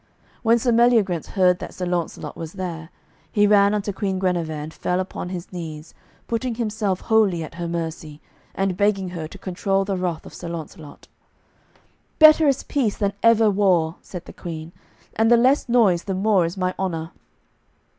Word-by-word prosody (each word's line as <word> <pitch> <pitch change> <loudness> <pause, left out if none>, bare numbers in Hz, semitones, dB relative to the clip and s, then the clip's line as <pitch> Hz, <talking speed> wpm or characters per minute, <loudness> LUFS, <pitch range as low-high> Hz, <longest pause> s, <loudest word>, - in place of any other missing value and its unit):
When 230 0 +4
Sir 240 +1 +1
Meliagrance 225 -8 +3
heard 180 -2 +2
that - - -8
Sir 180 - -3
Launcelot 175 -2 -3
was 165 -1 -7
there, 170 -4 -6 0.4
he 205 -2 +3
ran 205 0 +4
unto 205 -1 -2
Queen 195 -1 -2
Guenever 180 -4 -1
and 155 +1 -6
fell 180 +1 -1
upon 185 -1 -4
his 180 0 -7
knees, 160 -3 -7 0.3
putting 235 +1 -2
himself 215 -4 -2
wholly 205 -7 +2
at 155 - -9
her 170 0 -5
mercy, 160 -3 -5 0.4
and 195 -1 0
begging 195 -1 +1
her 165 -3 -5
to 200 - -12
control 195 +1 -1
the 195 -1 -1
wrath 180 -3 -3
of - - -11
Sir 170 - -7
Launcelot. 160 -2 -9 1.1
"Better 310 0 +7
is 275 -1 +1
peace 245 -8 -1
than 200 -2 0
ever 225 -2 +5
war," 180 -5 +2
said 180 -2 -9
the - - -11
Queen, 160 -1 -7 0.4
"and 225 +1 +3
the 240 - +6
less 260 +2 +3
noise 210 -8 +3
the 195 -2 -2
more 195 -2 +2
is 170 +3 -5
my 185 -1 0
honour." 165 -3 -3
185 Hz, 175 wpm, -22 LUFS, 170-210 Hz, 1.1 s, Better